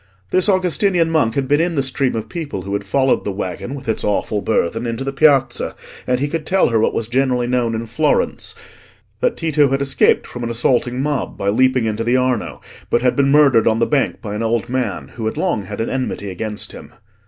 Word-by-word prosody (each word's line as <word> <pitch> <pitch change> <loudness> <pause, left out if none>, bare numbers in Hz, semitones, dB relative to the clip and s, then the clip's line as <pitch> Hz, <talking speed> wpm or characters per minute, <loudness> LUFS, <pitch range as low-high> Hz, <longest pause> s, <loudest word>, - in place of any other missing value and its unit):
This 185 +3 +2
Augustinian 185 -2 +2
monk 145 -9 +1
had 135 -1 0
been 145 +3 +3
in 170 0 0
the 140 - +1
stream 135 -1 0
of 110 -1 -4
people 150 - -5
who 100 +2 -5
had 100 - -1
followed 130 +6 +1
the 100 - -2
waggon 100 +7 -5
with 135 -2 -10
its 110 - -1
awful 105 0 0
burthen 115 +3 0
into 115 +3 -3
the 135 0 -3
Piazza, 135 -4 +2 0.3
and 125 0 +1
he 145 - 0
could 160 +1 -3
tell 190 +4 +2
her 115 -1 +2
what 110 - +1
was 115 - -2
generally 125 0 +1
known 120 -2 0
in 115 +1 -3
Florence—that 105 -2 -3
Tito 150 -4 +2
had 135 +1 0
escaped 140 -1 +2
from 125 - -7
an 120 - -2
assaulting 120 +2 +1
mob 145 -2 -2
by 100 - -1
leaping 130 +2 +2
into 110 +1 -1
the 120 +2 +2
Arno, 125 -3 -1 0.3
but 120 - +1
had 125 - +2
been 140 -1 +2
murdered 140 -6 +5
on 110 0 +3
the 115 - +2
bank 145 0 0
by 105 -2 -5
an 105 - -3
old 115 +1 -1
man 125 -4 -2
who 110 -2 -5
had 110 - -3
long 170 - -1
had 105 +2 -7
an 115 - -1
enmity 125 -6 -3
against 105 +3 -4
him. - - -11
125 Hz, 220 wpm, -19 LUFS, 110-140 Hz, 0.3 s, murdered